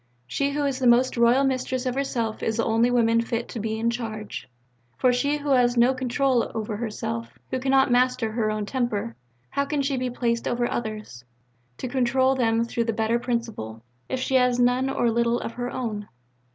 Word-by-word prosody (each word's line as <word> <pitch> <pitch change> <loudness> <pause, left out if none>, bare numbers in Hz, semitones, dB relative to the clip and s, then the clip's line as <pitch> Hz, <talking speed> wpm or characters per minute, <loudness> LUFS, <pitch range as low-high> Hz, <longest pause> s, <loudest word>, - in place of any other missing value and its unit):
"She 280 - -1
who 290 0 0
is 275 -2 -1
the 255 - +2
most 245 +2 +4
royal 235 +3 +4
mistress 260 -1 -1
of 255 - 0
herself 240 -5 -2
is 220 0 -1
the 230 - +1
only 225 +2 +3
woman 230 -2 +3
fit 230 0 -3
to 235 - -5
be 220 +1 -2
in 230 +1 +1
charge; 220 - -6 0.5
for 250 -1 +3
she 285 +4 +1
who 290 -1 -3
has 245 -2 +3
no 240 +2 +5
control 255 0 +1
over 215 -1 -3
herself, 230 +1 -4
who 260 - 0
cannot 265 0 +3
master 250 -2 +2
her 220 -1 0
own 215 -1 -2
temper, 210 - -2 0.4
how 280 - 0
can 285 -1 -1
she 275 -1 0
be 255 0 -1
placed 235 -1 -1
over 240 0 0
others, 215 - -5 0.5
to - - -4
control 260 +1 +2
them 230 -3 +2
through 235 0 -1
the 225 - 0
better 225 +2 +1
principle, 225 - -4 0.3
if 260 - -2
she 260 - -2
has 250 -1 +3
none 250 +2 +3
or 240 -3 +1
little 235 +1 +1
of - - -5
her 245 +1 -4
own?" 215 -5 -4
240 Hz, 200 wpm, -25 LUFS, 225-255 Hz, 0.5 s, no